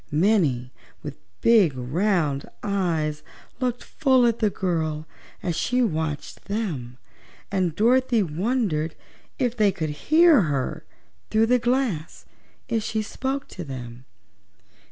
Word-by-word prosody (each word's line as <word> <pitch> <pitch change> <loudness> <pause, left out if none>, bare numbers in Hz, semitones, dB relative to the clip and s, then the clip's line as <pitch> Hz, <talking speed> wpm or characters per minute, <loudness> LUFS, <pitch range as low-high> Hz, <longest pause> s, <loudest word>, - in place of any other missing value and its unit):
Many 150 - +2 0.3
with - - -7 0.2
big 200 - +5
round 150 +1 0
eyes 170 -7 -1 0.4
looked 250 -2 -1
full 260 -5 +3
at 235 -1 +1
the 215 - +3
girl 160 -5 -2 0.4
as 175 -3 -1
she 250 +9 +1
watched 160 -7 -3
them 155 - -3 0.5
and 185 -5 0
Dorothy 240 +1 +3
wondered 170 -2 -1 0.4
if 245 -3 0
they 210 -4 +3
could 160 -4 -3 0.2
hear 320 -4 +7
her 145 -6 -2 0.5
through 220 +1 +3
the 250 +2 +3
glass 240 - -1 0.4
if 230 -3 0
she 220 0 -2
spoke 270 +5 -3
to 180 - -7
them. 125 -3 -8
195 Hz, 120 wpm, -24 LUFS, 155-235 Hz, 0.5 s, hear